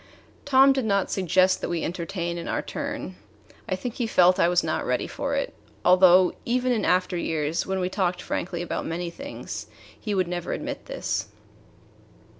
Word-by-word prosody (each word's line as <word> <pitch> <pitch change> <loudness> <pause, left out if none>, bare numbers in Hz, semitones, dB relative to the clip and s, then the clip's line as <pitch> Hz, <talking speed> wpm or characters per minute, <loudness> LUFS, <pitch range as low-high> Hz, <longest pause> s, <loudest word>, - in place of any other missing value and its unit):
Tom 270 0 +6
did 265 -3 -1
not 200 -2 +1
suggest 185 0 +2
that - - -3
we 170 -2 -1
entertain 170 0 -3
in 170 - -6
our - - -1
turn. 90 - -5 0.5
I 185 - +1
think 235 +5 -5
he 235 -2 -2
felt 180 -3 +4
I - - +5
was 175 0 +2
not - - -1
ready - - 0
for - - -3
it, - - -2 0.3
although 180 0 +6
even 250 +1 +1
in 230 -3 +1
after 180 0 +2
years, 160 -1 -1
when 190 0 -1
we 180 - 0
talked 185 -2 -1
frankly 175 -1 -3
about 175 - -3
many 170 +1 -3
things, 280 +10 -7 0.3
he 210 -2 -2
would 185 -2 +1
never 175 -1 -3
admit - - -5
this. - - -2
185 Hz, 180 wpm, -25 LUFS, 175-205 Hz, 0.5 s, Tom